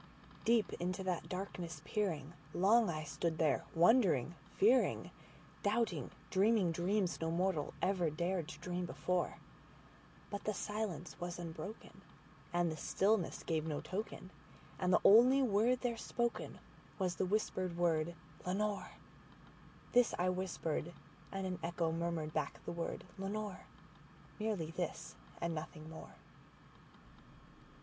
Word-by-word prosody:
Deep 230 -4 +3
into 185 +2 -2
that 180 -2 -2
darkness 180 -2 -5
peering, 170 - -1 0.2
long 215 +4 +5
I 155 -2 -2
stood 160 +3 -2
there 155 -4 +2
wondering, 170 - +5 0.2
fearing, 240 +6 +4 0.5
Doubting, 205 - +1 0.2
dreaming 200 -2 +4
dreams 180 +1 0
no 165 - 0
mortals 170 -3 0
ever 185 -3 +2
dared 170 +2 -1
to - - -8
dream 180 +1 -3
before; 180 +1 -1 0.9
But 200 0 -4
the 215 - 0
silence 205 -5 -3
was 175 0 -4
unbroken, 170 +4 -7 0.5
and 175 -1 +2
the 155 - -5
stillness 195 0 +1
gave 160 -1 0
no 150 -2 -1
token, 190 -1 -5 0.5
And 180 -1 +2
the - - +6
only 250 +6 +8
word 240 +2 +3
there 240 -2 0
spoken 235 +1 -2 0.4
was 185 -3 +1
the - - +1
whispered 185 -3 0
word, 170 -1 +2 0.3
"Lenore?"This 210 +4 -2
I 180 +1 +2
whispered, 175 -3 -2 0.4
and 195 -1 -3
an 185 -1 -3
echo 170 -1 0
murmured 165 -2 -2
back 155 - -2
the - - -3
word, 170 -1 -3 0.2
"Lenore:"Merely 205 -2 -5
this - - -4 0.3
and 170 0 -1
nothing 155 0 -6
more. 160 - -10
180 Hz, 125 wpm, -36 LUFS, 165-205 Hz, 0.9 s, only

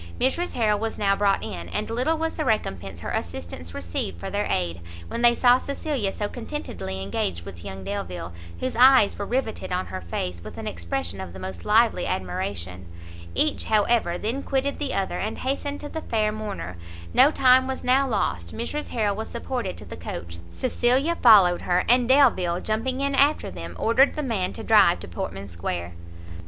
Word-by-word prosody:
Mrs 335 +8 0
Harrel 215 -3 +2
was 225 +1 -3
now 200 -1 +2
brought 200 -1 +2
in, 85 -1 -6
and - - -3
little 255 +8 0
was 325 0 -1
the 310 - -2
recompense 95 - -2
her - - -4
assistants 85 -1 -5
received 85 0 -3
for - - -5
their 205 +1 -1
aid, 85 -1 -1 0.3
when 235 - -3
they 240 0 +6
saw 245 +1 +5
Cecilia 280 -7 -2
so 205 - -3
contentedly 225 - -5
engaged 90 -3 -2
with 85 -2 -9
young 95 0 -7
Delvile, 90 -3 -5 0.3
whose 130 - -2
eyes 250 -4 +6
were 200 - -3
rivetted 245 -6 -2
on 180 +1 0
her 95 0 -6
face, 85 0 -4
with - - -9
an - - -6
expression 85 +2 -3
of 90 -2 -7
the 95 - -9
most 95 -2 -7
lively - - +3
admiration; 90 0 -3 0.5
each, 305 -1 +2
however, 215 -4 +2
then 230 +8 -2
quitted 275 +1 -1
the 290 -3 -2
other, 195 -1 -1
and 215 - -3
hastened 285 +2 -2
to 295 - -6
the 320 - -5
fair 215 -5 0
mourner; 205 - -5 0.4
no 280 - +7
time 260 -3 +5
was 265 0 -4
now 270 +2 +3
lost, 90 - -1
Mrs 295 +6 -4
Harrel 210 -3 0
was 220 +2 -5
supported 235 -4 -4
to 105 - -10
the 85 - -8
coach, 85 +1 -7
Cecilia 260 +5 +1
followed 195 -7 +7
her, 180 0 +1
and 245 +1 +4
Delvile, 190 -11 +4
jumping 250 +5 -1
in 280 0 0
after 280 - +3
them, 85 -1 -8
ordered 245 - +3
the 300 - -2
man 205 -8 -1
to 225 - -7
drive 205 -6 +5
to - - -8
Portman 95 +3 -5
square. 85 0 -4
205 Hz, 190 wpm, -25 LUFS, -, 0.5 s, no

